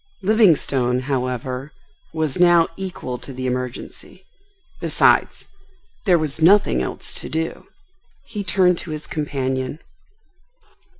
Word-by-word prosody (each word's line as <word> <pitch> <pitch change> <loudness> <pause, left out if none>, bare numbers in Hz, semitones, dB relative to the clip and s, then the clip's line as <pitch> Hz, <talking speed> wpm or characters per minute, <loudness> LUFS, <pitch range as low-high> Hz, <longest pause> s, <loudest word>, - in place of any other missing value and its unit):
Livingstone, 150 - +3
however, 130 +1 -3 0.4
was 160 -3 -2
now 175 -2 +6
equal 175 -10 -5
to - - -10
the 130 0 -5
emergency. 125 -1 -5 0.5
Besides, - - +2 0.6
there 180 -2 +6
was 155 -1 -3
nothing 170 - +5
else - - -5
to - - -7
do. 160 +1 -3 0.6
He 210 -3 -5
turned 180 -2 +3
to - - -8
his 155 -1 -5
companion. 135 -2 -3
150 Hz, 110 wpm, -21 LUFS, 130-175 Hz, 0.6 s, now